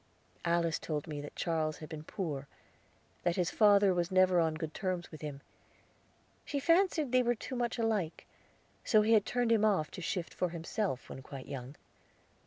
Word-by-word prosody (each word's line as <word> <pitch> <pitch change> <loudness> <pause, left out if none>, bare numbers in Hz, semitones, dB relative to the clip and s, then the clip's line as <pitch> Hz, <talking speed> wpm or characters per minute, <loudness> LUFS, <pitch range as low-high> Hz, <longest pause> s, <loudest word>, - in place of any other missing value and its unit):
Alice 170 -1 +1
told 150 -2 -3
me 150 -2 -5
that 145 - -9
Charles 160 -2 -1
had 155 - -8
been 155 -1 -7
poor; 155 -7 -4 0.7
that 175 -1 +1
his 180 -2 0
father 205 -3 +5
was 175 -1 0
never 185 -1 +4
on 160 -1 +2
good 155 0 -5
terms 185 -2 -3
with 155 - -10
him. 145 -2 -6 1.0
She 285 - -2
fancied 330 -3 +3
they 255 0 +5
were 240 0 +2
too 255 +4 -6
much 240 -1 -1
alike; 215 -8 -1 0.6
so 215 -2 +4
he 225 +2 +4
had 215 -2 +4
turned 245 -1 +1
him 220 -2 +4
off 195 -8 +2
to - - -7
shift 175 0 -3
for 180 - -1
himself, 170 - -3
when 130 - -8
quite 130 0 -9
young. 130 +1 -7
175 Hz, 185 wpm, -32 LUFS, 155-215 Hz, 1.0 s, father